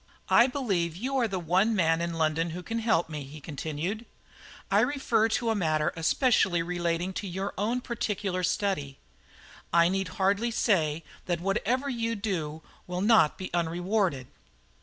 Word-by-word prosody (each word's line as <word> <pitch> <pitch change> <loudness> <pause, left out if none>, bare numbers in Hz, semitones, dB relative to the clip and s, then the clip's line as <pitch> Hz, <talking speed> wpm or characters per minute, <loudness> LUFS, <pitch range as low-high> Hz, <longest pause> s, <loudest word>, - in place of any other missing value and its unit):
"I 235 - +6
believe 195 - -1
you 260 +8 -2
are 240 -3 +2
the 195 -3 -3
one 185 +6 +2
man 165 -3 +2
in 170 0 -2
London 165 +1 +1
who 180 - -7
can 230 +4 -3
help 220 -7 +2
me," 150 -2 -5
he 145 +3 -10
continued. 160 - -4 0.6
"I - - +5
refer 260 -6 +2
to 230 0 0
a - - 0
matter 155 -5 +1
especially 175 - +2
relating 175 +1 -1
to 200 - -4
your 190 +2 -3
own 230 +5 -1
particular 205 -6 -2
study. 160 -7 -1 0.7
I 170 0 +5
need 195 0 -1
hardly 200 +5 +2
say 165 -9 +1 0.2
that 175 -2 0
whatever 225 +9 0
you 230 -3 -1
do 165 -7 -3 0.2
will 180 0 -3
not 210 -7 +4
be 185 - -7
unrewarded." 175 -3 0
185 Hz, 160 wpm, -28 LUFS, 165-220 Hz, 0.7 s, I